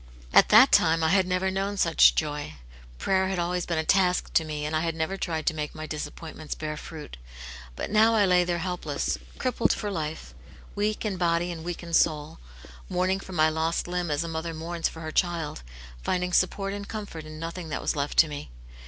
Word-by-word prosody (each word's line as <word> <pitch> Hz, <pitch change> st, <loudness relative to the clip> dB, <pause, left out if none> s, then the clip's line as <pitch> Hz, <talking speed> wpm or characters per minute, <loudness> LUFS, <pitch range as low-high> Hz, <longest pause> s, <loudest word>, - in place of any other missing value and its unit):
At -, -, +7 dB
that 225 Hz, +6 st, +8 dB
time 165 Hz, -1 st, +4 dB
I 160 Hz, -, +3 dB
had 190 Hz, +1 st, +3 dB
never 185 Hz, +1 st, 0 dB
known 195 Hz, +1 st, -2 dB
such 165 Hz, -3 st, +5 dB
joy; 150 Hz, -, -2 dB, 0.4 s
prayer 190 Hz, -, +1 dB
had 190 Hz, -1 st, -2 dB
always 175 Hz, 0 st, -1 dB
been 170 Hz, -, -1 dB
a 160 Hz, -, +1 dB
task 185 Hz, -1 st, +2 dB
to 160 Hz, -, +4 dB
me, 150 Hz, -1 st, -4 dB
and 155 Hz, +1 st, -2 dB
I -, -, +2 dB
had 165 Hz, -1 st, -1 dB
never 160 Hz, +4 st, -2 dB
tried 165 Hz, -4 st, -3 dB
to 165 Hz, -, +2 dB
make 150 Hz, -1 st, -4 dB
my 155 Hz, 0 st, -6 dB
disappointments 155 Hz, 0 st, -6 dB
bear 155 Hz, -1 st, -4 dB
fruit. 150 Hz, -, -9 dB, 0.6 s
But -, -, -4 dB
now 220 Hz, +2 st, +5 dB
I 210 Hz, -2 st, +4 dB
lay 180 Hz, -1 st, +4 dB
there 175 Hz, 0 st, -1 dB
helpless, 175 Hz, -4 st, -2 dB, 0.2 s
crippled 255 Hz, -2 st, +1 dB
for 205 Hz, -2 st, -3 dB
life, 160 Hz, -3 st, -5 dB, 0.4 s
weak 210 Hz, +2 st, -1 dB
in 200 Hz, -3 st, -1 dB
body 175 Hz, 0 st, +1 dB
and 165 Hz, -2 st, -7 dB
weak 175 Hz, 0 st, -5 dB
in 170 Hz, -1 st, -8 dB
soul; 155 Hz, -2 st, +1 dB, 0.5 s
mourning 185 Hz, +1 st, +1 dB
for 190 Hz, -, -10 dB
my 155 Hz, -2 st, +4 dB
lost 160 Hz, +2 st, -1 dB
limb 175 Hz, -1 st, -2 dB
as 150 Hz, +2 st, 0 dB
a -, -, -5 dB
mother 165 Hz, 0 st, -4 dB
mourns 165 Hz, +1 st, -2 dB
for 160 Hz, -, -10 dB
her 155 Hz, -1 st, -5 dB
child, 170 Hz, -, -1 dB, 0.4 s
finding 180 Hz, -, -1 dB
support 195 Hz, +2 st, +1 dB
and 200 Hz, 0 st, -6 dB
comfort 205 Hz, -7 st, -6 dB
in 155 Hz, 0 st, -9 dB
nothing 165 Hz, +1 st, -6 dB
that 150 Hz, -, -2 dB
was -, -, 0 dB
left 145 Hz, 0 st, -2 dB
to 160 Hz, -, +7 dB
me. 145 Hz, -, -7 dB
170 Hz, 215 wpm, -27 LUFS, 155-185 Hz, 0.6 s, that